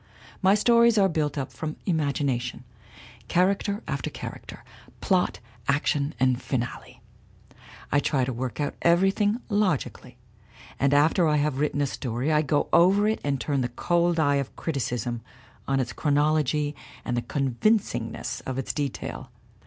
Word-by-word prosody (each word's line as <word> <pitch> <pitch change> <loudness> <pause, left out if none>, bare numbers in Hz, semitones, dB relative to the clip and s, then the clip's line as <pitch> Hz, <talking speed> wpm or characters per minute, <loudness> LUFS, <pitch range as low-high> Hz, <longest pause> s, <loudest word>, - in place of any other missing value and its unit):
My 195 +1 +5
stories 235 +1 +4
are 195 -2 +5
built 155 -4 -1
up 135 -2 -3
from 155 -1 -4
my - - -16
imagination, 140 -7 -1 0.6
character 200 - +1
after 140 -4 -2
character, - - -9 0.4
plot, - - +1 0.3
action 140 0 +1
and 130 0 +2
finale. 120 -3 -4 0.9
I 145 - +4
try 135 -3 +1
to 130 - -3
work 125 +3 -4
out 145 -1 -1
everything 195 +6 +3
logically, 185 - -1 0.6
and 140 +1 +3
after 160 +4 +4
I 150 - +2
have 145 -2 0
written 145 -1 0
a - - +3
story 130 +1 -2
I 150 0 +4
go 145 -1 +1
over 195 +4 +5
it 220 - 0
and 140 -2 -1
turn 140 0 -1
the 125 - -1
cold 170 +6 +1
eye 145 -2 +3
of 140 -2 -4
criticism 120 -6 -3 0.5
on 135 0 +1
its 125 -2 -2
chronology 150 0 +1 0.3
and 120 - -1
the 120 - 0
convincingness 125 - -1
of 130 -1 -3
its 135 - -2
detail. 145 -3 -4
145 Hz, 150 wpm, -26 LUFS, 130-170 Hz, 0.9 s, My